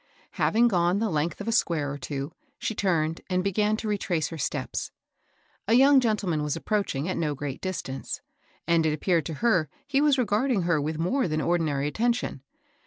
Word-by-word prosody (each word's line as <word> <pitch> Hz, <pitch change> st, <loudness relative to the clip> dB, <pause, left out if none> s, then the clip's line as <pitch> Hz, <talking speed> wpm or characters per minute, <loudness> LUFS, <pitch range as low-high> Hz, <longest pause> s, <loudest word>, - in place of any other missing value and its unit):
Having 235 Hz, +2 st, +3 dB
gone 175 Hz, -2 st, +2 dB
the 220 Hz, -1 st, 0 dB
length 155 Hz, +5 st, -1 dB
of 205 Hz, -, -6 dB
a -, -, +1 dB
square 165 Hz, -11 st, +1 dB
or 145 Hz, -, -5 dB
two, 140 Hz, +2 st, -4 dB, 0.3 s
she 220 Hz, -, -2 dB
tamed 165 Hz, -6 st, 0 dB
and 185 Hz, 0 st, +1 dB
began 210 Hz, +2 st, +1 dB
to 220 Hz, -, -5 dB
retrace 185 Hz, -6 st, -1 dB
her 165 Hz, -, -7 dB
steps. -, -, -3 dB, 0.8 s
A 225 Hz, -, +3 dB
young 270 Hz, +2 st, +7 dB
gentleman 205 Hz, -10 st, 0 dB
was 150 Hz, -1 st, -1 dB
approaching, 195 Hz, -9 st, -1 dB
at 185 Hz, -, -2 dB
no 150 Hz, -3 st, -1 dB
great 140 Hz, -1 st, -5 dB
distance; 170 Hz, -8 st, -4 dB, 0.5 s
and 170 Hz, -1 st, +3 dB
it 155 Hz, -1 st, +2 dB
appeared 165 Hz, +2 st, +1 dB
to 160 Hz, -, -4 dB
her 175 Hz, -, +3 dB, 0.2 s
he 280 Hz, -1 st, +1 dB
was 295 Hz, -2 st, +4 dB
regarding 230 Hz, -2 st, +1 dB
her 170 Hz, -3 st, +2 dB
with 155 Hz, +2 st, -2 dB
more 180 Hz, -, +1 dB
than 155 Hz, -1 st, -1 dB
ordinary 155 Hz, -4 st, 0 dB
attention. 230 Hz, -, -1 dB
175 Hz, 185 wpm, -26 LUFS, 155-215 Hz, 0.8 s, young